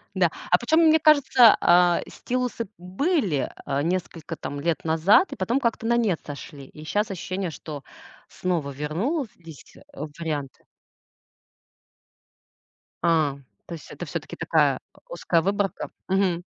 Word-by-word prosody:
Да. - - +3 0.2
А - - +6
почем, 320 0 +2
мне 320 -1 +5
кажется, 285 -6 +6
а, 175 0 +4
стилусы 250 -3 -3
были, 190 - -1
а, 140 0 -1
несколько 170 -2 -3
там 145 - -6
лет 165 +1 -1
назад, 165 - +4
и - - -6
потом 235 +8 0
как-то 235 -3 -1
на 235 +1 +3
нет 210 -8 +1
сошли. 145 -1 -9
И 155 - -13
щас 210 +5 -1
ощущение, 185 0 -3
что 145 -1 -8 0.5
снова 170 -6 -2
вернулись, 165 - -4
э, - - -16 0.4
варианты. 150 -5 -5 2.4
А, 160 -5 +2 0.3
то 170 - -8
есть 160 - -12
это - - -7
всё-таки - - -6
такая, - - +2 0.2
э, - - -25
узкая 175 - +1
выборка, 195 +2 -1 0.2
мгм. 185 -2 +1
180 Hz, 135 wpm, -25 LUFS, 160-230 Hz, 2.4 s, А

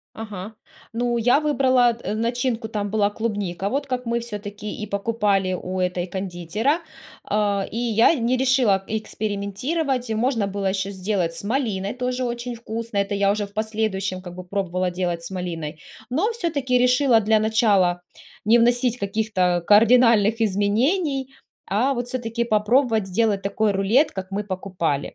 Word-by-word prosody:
Ага, 215 -1 -7 0.4
ну, 240 +1 0
я 245 +4 +4
выбрала 260 -5 +3
н 215 +1 -3
начинку, 235 -1 -1
там 205 -2 -3
была 210 -1 +2
клубника, 205 -4 -3
вот 280 +5 -2
как 250 -2 -3
мы 235 0 0
всё-таки 210 -2 -6
и 215 - -3
покупали 200 -2 0
у 185 +1 -4
этой 180 -1 -1
кондитера. 195 - -1 0.5
Э, 205 -1 +1
и - - -7
я 235 +4 +4
не 250 -2 +1
решила 250 -7 +3
экспериментировать, 220 - -2
и - - 0
можно 225 -2 +1
было 200 0 -3
еще 190 0 -1
сделать 185 -3 -1
с - - -4
малиной, 210 -5 -1
тоже 250 0 -2
очень 240 0 -4
вкусно, 230 -1 -6
это 200 +1 0
я 200 0 +2
уже 205 +1 0
в 200 - -21
последующем 215 -4 -2
как 175 -1 -9
бы 185 - -7
пробовала 185 -1 -2
делать 175 -2 -2
с 170 - -6
малиной, 165 -4 -5 0.3
но 370 - +1
всё-таки 295 - -1
решила 250 -1 +4
для 220 +1 +3
начала 210 -5 +2 0.4
не 225 +3 +5
вносить 245 +1 +2
каких-то 195 -4 0
кардинальных 230 0 +5
изменений, 255 - +1 0.4
а 235 +8 +1
вот 245 -1 -3
всё-таки 235 -2 -2
попробовать 220 0 +2
сделать 200 +1 +1
такой 205 +2 0
рулет, 205 +9 +3
как 190 0 -7
мы 205 +2 -1
покупали 185 -7 -3
215 Hz, 155 wpm, -23 LUFS, 195-245 Hz, 0.5 s, не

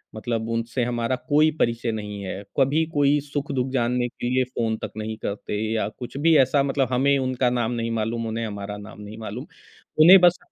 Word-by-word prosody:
मतलब 115 0 -3
उनसे 115 +2 -1
हमारा 120 +1 -1
कोई 155 +2 +5
परिचय 115 0 0
नहीं 105 -2 -5
है, 95 +1 -5 0.2
कभी 145 +4 +3
कोई 145 0 +3
सुख-दुःख 140 -3 -3
जानने 125 0 +1
के 120 0 -5
लिए 130 0 +3
फ़ोन 115 -3 -2
तक - - -4
नहीं 110 0 -4
करते 105 +1 -3
या 105 -2 0
कुछ 125 +4 -9
भी 160 +2 +4
ऐसा 135 +2 +2
मतलब 135 -2 0
हमें 140 +2 +3
उनका 130 -1 0
नाम 120 -1 -1
नहीं 115 -1 -2
मालूम, 115 +1 -2
उन्हें 115 +1 -3
हमारा 100 0 -6
नाम 105 0 -11
नहीं 105 +2 -9
मालूम। 110 +6 -6 0.5
उन्हें 180 +5 +9
बस 175 0 +5
120 Hz, 195 wpm, -24 LUFS, 110-135 Hz, 0.5 s, उन्हें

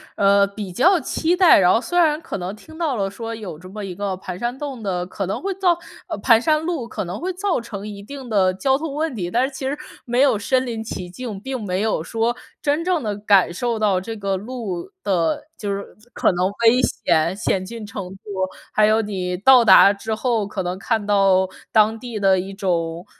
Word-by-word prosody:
呃， 200 0 +4
比 200 -2 -7
较 350 - +4
期 335 +3 0
待， 360 - +7
然 180 -1 +5
后 - - +3
虽 350 - -3
然 310 -2 +3
可 - - -5
能 185 +2 -5
听 315 +9 -14
到 315 -6 0
了 195 -2 -1
说 230 +3 -6
有 195 -8 -7
这 185 - -12
么 210 +2 -7
一 190 -2 -5
个 195 0 -3
盘 185 -1 -7
山 240 +3 -2
洞 275 -5 -6
的 180 -3 -2
可 195 +2 -4
能 190 - -3
会 390 +1 -2
造 360 -3 +2 0.3
呃， - - -4
盘 230 -3 +5
山 305 +2 +2
路 320 -8 -2
可 - - -4
能 180 +2 -5
会 365 +3 -3
造 380 -5 0
成 210 -3 -7
一 200 -1 -8
定 265 +4 -9
的 190 -4 +3
交 265 +8 +1
通 300 -1 -5
问 315 -1 -1
题， 175 -5 -3
但 240 +7 +2
是 285 - -11
其 265 0 -4
实 285 +2 -2 0.3
没 245 +2 +1
有 270 -7 +4
身 260 +5 +1
临 225 -3 -4
其 180 -5 -6
境。 250 +8 -8 0.2
并 260 -3 -3
没 185 0 -1
有 220 -7 0
说 230 +5 -1 0.3
真 295 +3 +1
正 355 -5 0
地 210 -2 -2
感 200 -4 +4
受 235 +4 -1
到 200 -4 +2
这 225 +4 -6
个 195 -2 -2
路 215 - -5
的 175 - 0
就 205 -2 -3
是 200 0 -3 0.3
可 - - +2
能 180 +1 +1 0.2
危 240 +3 +6
险， 165 -5 +1
险 195 -2 -1
峻 225 +1 -7
程 200 -2 -6
度， 190 - -11 0.6
还 215 - +4
有 220 +1 +3
你 185 -4 -3
到 250 +5 +6
达 195 -1 +8
之 210 +2 -4
后 225 -3 0
可 200 -2 -4
能 180 +1 -3
看 220 0 -1
到 195 -2 +3 0.2
当 220 0 +3
地 240 -4 -6
的 190 -1 +4
一 190 +2 -5
种 170 -3 -2
215 Hz, 245 characters per minute, -21 LUFS, 190-255 Hz, 0.6 s, 达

